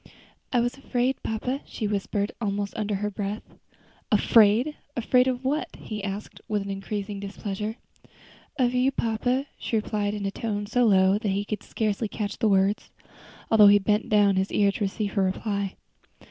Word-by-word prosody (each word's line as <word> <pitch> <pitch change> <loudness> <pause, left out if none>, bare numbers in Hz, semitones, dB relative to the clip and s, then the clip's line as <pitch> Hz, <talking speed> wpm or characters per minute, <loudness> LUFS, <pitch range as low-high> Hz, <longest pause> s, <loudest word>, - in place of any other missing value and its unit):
"I 245 - +3
was 245 +2 -1
afraid, 260 -1 -1
papa," 250 +5 -2
she 220 - -5
whispered, 205 0 -1
almost 200 -1 -2
under 210 -1 -1
her 210 +1 -2
breath. 205 +1 -4 0.7
"Afraid! 230 +7 +5 0.2
afraid 250 +2 +3
of 255 0 -2
what?" 290 +4 0
he 210 -2 -6
asked, 200 +1 -6
with 205 -2 -1
increasing 200 +1 -4
displeasure. 200 +2 -4 0.8
"Of 245 -2 +2
you, 250 +2 +3
papa," 245 +3 0
she - - -2
replied, 210 -1 -1
in 205 -1 -4
a 195 - -1
tone 205 -1 -3
so 245 +4 +2
low 190 -1 +4
that 215 - -2
he 200 +1 -1
could 210 0 -4
scarcely 215 0 -1
catch 205 0 -4
the 220 - +3
words, 195 +1 +2 0.6
although 215 -2 +8
he 205 0 +8
bent 210 +2 0
down 205 -2 +4
his 190 +1 0
ear 200 -1 +3
to 205 - -3
receive 200 +1 -3
her 200 - +1
reply. 200 +1 -2
210 Hz, 170 wpm, -26 LUFS, 200-230 Hz, 0.8 s, although